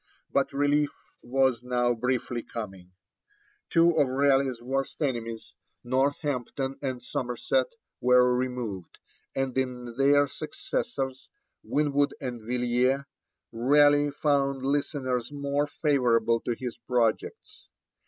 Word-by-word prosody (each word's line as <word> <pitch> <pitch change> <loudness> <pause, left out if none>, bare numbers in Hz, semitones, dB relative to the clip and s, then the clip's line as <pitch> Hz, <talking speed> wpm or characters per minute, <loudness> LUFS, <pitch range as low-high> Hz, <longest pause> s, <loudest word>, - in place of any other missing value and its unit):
But - - +2
relief 145 +1 +2 0.3
was 130 -1 +1
now 125 -1 +1
briefly 125 0 -1
coming. 95 -7 -8 0.8
Two 170 0 +5
of 140 - +4
Raleigh's 135 -1 +2
worst 135 +3 -3
enemies, 115 -6 -3 0.3
Northampton 135 0 -1
and 130 -3 -3
Somerset, 125 - -1 0.3
were 125 0 +5
removed, 125 -7 -4 0.4
and 135 -1 -1
in 125 -2 -3
their 145 +1 +5
successors, 135 0 -4 0.3
Winwood 145 -1 +1
and 125 -3 -5
Villiers, 125 +3 +1 0.5
Raleigh 145 +4 +4
found 140 -2 0
listeners 135 -3 -1
more 145 0 -1
favourable 120 -7 +2
to 120 - 0
his 125 -3 -5
projects. 115 -1 -2
130 Hz, 105 wpm, -27 LUFS, 120-140 Hz, 0.8 s, Two